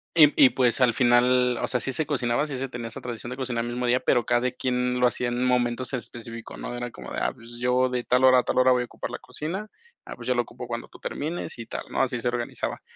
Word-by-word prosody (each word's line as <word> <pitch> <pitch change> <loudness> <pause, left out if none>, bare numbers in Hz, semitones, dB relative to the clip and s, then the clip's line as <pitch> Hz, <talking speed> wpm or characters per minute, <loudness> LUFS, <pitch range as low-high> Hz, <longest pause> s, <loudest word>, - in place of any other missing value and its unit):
y 150 -4 +7
y 130 - +7
pues, 125 0 +2
al 125 -2 +5
final, 125 +1 +4
o - - 0
sea, 125 - 0
sí 135 - -1
se 155 +4 -1
cocinaba, 135 0 0
sí 140 - -4
se 135 +1 -3
tenía 120 -2 -5
esa 115 - -8
tradición 120 0 -6
de 125 - -4
cocinar 120 -3 -2
el 120 - -4
mismo 125 0 -2
día, 125 +1 +3
pero 120 -2 +2
cada 120 +1 +2
quien 125 0 -1
lo 125 - +6
hacía 120 0 -1
en 120 +1 -1
momentos 125 0 +1
en 125 - 0
específico, 115 -1 -9
¿no?, - - -5
era 120 0 -4
como - - -10
de: - - -4
"Ah, - - 0
pues, 120 -1 -12
yo 125 +1 +2
de 125 -1 -2
tal 125 +1 +2
hora 130 -1 +7
a - - +1
tal - - 0
hora 130 0 +5
voy 125 -1 +3
a - - -5
ocupar - - -7
la - - -4
cocina", 185 +8 -5 0.4
"Ah, - - -7
pues, - - -9
yo 125 - +3
lo 120 - +2
ocupo 120 +2 -9
cuando 120 0 -5
tú - - -16
termines", 160 -2 -4
y 115 - -6
tal, - - -5
¿no?, - - +1
así 125 -2 -2
se 125 - -1
organizaba. 120 0 -3
125 Hz, 285 wpm, -26 LUFS, 120-130 Hz, 0.4 s, y